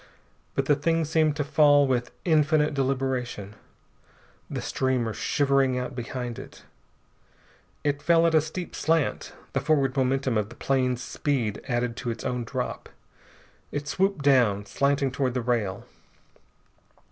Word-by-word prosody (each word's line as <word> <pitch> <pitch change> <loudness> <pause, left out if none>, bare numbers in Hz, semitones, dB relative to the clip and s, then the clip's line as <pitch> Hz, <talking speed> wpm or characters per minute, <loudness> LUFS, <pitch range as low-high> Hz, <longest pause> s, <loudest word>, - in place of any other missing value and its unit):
But 135 - 0
the 145 - +4
thing 165 +3 +1
seemed 155 -1 +2
to 145 - -1
fall 145 -1 +5
with 125 -2 0 0.2
infinite 155 -2 +3
deliberation, 130 -6 -2 1.0
the - - -3
streamer 125 -4 -1
shivering 135 -1 +1
out 125 +1 -4
behind 120 -1 -5
it. - - -12 1.2
It 145 -1 0
fell 170 +1 +4
at 165 - +2
a 155 - +5
steep 165 +4 -6
slant, 160 -2 0 0.2
the - - 0
forward 140 -4 +1
momentum 130 -3 +1
of 105 0 -3
the 120 - -12
plane's 130 -2 0
speed 125 -8 -2
added 120 -2 -1
to 120 - -4
its 115 - -4
own 125 -2 -2
drop. 125 +1 -4 0.8
It 145 0 -4
swooped 190 -2 0
down, 115 -8 +4
slanting 140 +6 +1
toward 130 -1 -1
the 125 - 0
rail.... 115 -6 -1
135 Hz, 140 wpm, -26 LUFS, 125-145 Hz, 1.2 s, fall